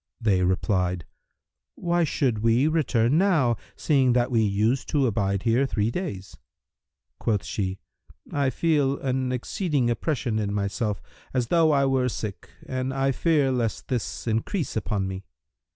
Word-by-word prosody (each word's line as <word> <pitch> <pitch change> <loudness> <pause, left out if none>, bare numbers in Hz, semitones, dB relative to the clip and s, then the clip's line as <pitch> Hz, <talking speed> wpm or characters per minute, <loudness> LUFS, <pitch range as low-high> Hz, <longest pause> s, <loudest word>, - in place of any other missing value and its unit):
They 100 -6 +2
replied, 90 -1 0 0.7
"Why 175 -1 +1
should 130 -7 0
we 115 +6 +3
return 145 -4 +2
now, 155 - +3 0.2
seeing 135 -5 +2
that 125 +1 +1
we 115 -2 +3
use 110 +5 +1
to 145 -4 +1
abide 100 -4 0
here 120 +4 +2
three 110 -2 0
days?" 120 - -5 0.8
Quoth 105 -6 0
she, 95 +3 -2 0.5
"I 140 -2 +1
feel 140 -1 +1
an 130 -1 -1
exceeding 130 0 0
oppression 120 -3 -1
in 100 -1 -2
myself, 100 0 -2 0.3
as 120 -2 0
though 165 -2 +4
I 140 -2 +3
were 130 -1 +2
sick, 105 -3 -6 0.2
and 130 0 -2
I 135 0 +1
fear 145 -1 +2
lest 120 -4 -2
this 125 -4 -3
increase 115 - -1
upon 100 -3 -1
me." 95 0 -5
120 Hz, 145 wpm, -25 LUFS, 105-140 Hz, 0.8 s, though